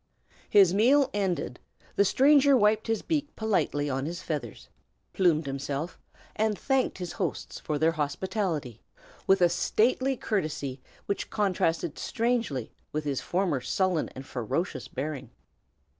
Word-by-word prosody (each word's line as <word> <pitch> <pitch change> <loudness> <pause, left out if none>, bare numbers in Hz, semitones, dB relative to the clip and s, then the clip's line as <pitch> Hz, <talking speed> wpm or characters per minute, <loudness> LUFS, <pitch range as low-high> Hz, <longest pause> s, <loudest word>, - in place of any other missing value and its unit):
His 195 -4 +6
meal 260 +7 +4
ended, 180 -11 -1 0.4
the 200 - +5
stranger 280 +5 +5
wiped 210 -1 +3
his 225 -1 0
beak 295 -3 -2
politely 170 -9 0
on 135 +1 -2
his 170 +2 -4
feathers, 150 - -5 0.5
plumed 165 -5 +3
himself, 140 +4 -4 0.4
and 215 -1 +1
thanked 270 -2 0
his 180 -2 -5
hosts 185 -6 -4
for 150 - -2
their 160 +2 +3
hospitality, 155 - -2 0.5
with 195 -1 +4
a - - +8
stately 255 +9 +1
courtesy 150 - -2 0.2
which 200 - -3
contrasted 175 -6 0
strangely 225 - -1 0.2
with 155 0 -2
his 140 -3 -2
former 175 -7 0
sullen 180 +6 0
and 130 +1 -8
ferocious 130 - -3
bearing. 135 -3 -5
175 Hz, 130 wpm, -28 LUFS, 145-215 Hz, 0.5 s, a